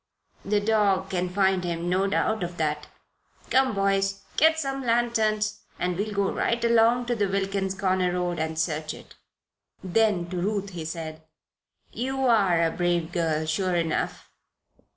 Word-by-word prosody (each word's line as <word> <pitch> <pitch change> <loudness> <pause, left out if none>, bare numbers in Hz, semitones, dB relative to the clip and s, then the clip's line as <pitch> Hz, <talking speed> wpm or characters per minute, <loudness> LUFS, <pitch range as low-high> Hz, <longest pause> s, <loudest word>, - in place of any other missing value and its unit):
"The 205 +1 +1
dog 205 -3 +1
can 180 -1 -1
find 190 0 +2
him 170 -1 -3
no 185 +2 +1
doubt 220 +2 0
of 175 0 -4
that. 150 -1 -1 0.6
Come, 260 -4 +3
boys, 195 0 0
get 320 +1 +4
some 275 -3 -2
lanterns 220 -3 +1 0.2
and 180 0 -1
we'll 205 +4 -2
go 200 -1 0
right 235 0 0
along 235 +1 +4
to 240 0 0
the 205 -3 +1
Wilkins 195 0 -1
Corners 185 -2 +1
road 175 -1 -1
and 160 0 -2
search 155 -1 -2
it." - - -14 0.7
Then 190 -2 +1
to 180 - -3
Ruth 200 0 -2
he 170 -3 -6
said: 160 -1 -6 0.7
"You 265 +2 -2
are 195 -8 +4
a 165 - +2
brave 175 -2 0
girl, 160 -3 0
sure 180 +3 0
enough." 165 -2 -1
195 Hz, 155 wpm, -26 LUFS, 175-215 Hz, 0.7 s, get